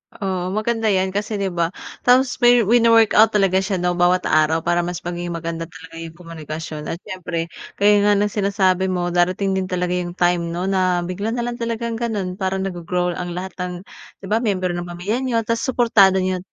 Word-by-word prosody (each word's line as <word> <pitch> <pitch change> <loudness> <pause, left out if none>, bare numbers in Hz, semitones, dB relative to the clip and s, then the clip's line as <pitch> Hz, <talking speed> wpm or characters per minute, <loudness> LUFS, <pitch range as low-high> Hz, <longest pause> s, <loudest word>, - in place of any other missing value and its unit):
Oo, 185 -2 -3
maganda 225 +1 0
'yan 190 -2 +1
kasi, 210 +2 -3
'di 195 -2 -2
ba? 170 -1 0 0.3
Tapos 250 +1 +3
may 240 -1 +5
wino-workout 225 0 +5
talaga 190 -2 +3
siya, 190 +1 -1
'no, 180 -1 0
bawat 175 +1 +2
araw. 155 +1 +2
para 175 0 +1
mas 175 0 -3
magiging 175 0 -4
maganda 165 0 -4
talaga 165 -1 -12
'yong 165 -1 -8
komunikasyon. 160 -2 -7
At 170 - -5
siyempre, 170 -2 -5 0.2
gaya 205 +1 +4
nga 205 - +5
ng 205 0 +1
sinasabi 190 -2 +1
mo, 175 -1 -1
darating 185 +3 +1
din 190 -1 -1
talaga 180 -1 -2
'yong 180 -1 -2
time 175 -1 +1
'no, 170 +2 -3
na 185 -2 +1
bigla 200 +6 -3
na 240 - -2
lang 240 0 -4
talagang 230 0 -3
gano'n. 200 -6 -3
Parang 190 0 -1
naggo-grow 180 -1 -2
ang 175 -1 -4
lahat 185 +1 -5
ng, 180 0 -3 0.5
'di - - -6
ba, 220 - +3
miyembro 185 -6 -1
ng 175 0 -4
pamilya 180 +8 -3
niyo. 235 -4 0
Tapos 230 +1 -1
suportado 200 -7 +4
niyo 185 0 -1
185 Hz, 195 wpm, -21 LUFS, 175-210 Hz, 0.5 s, may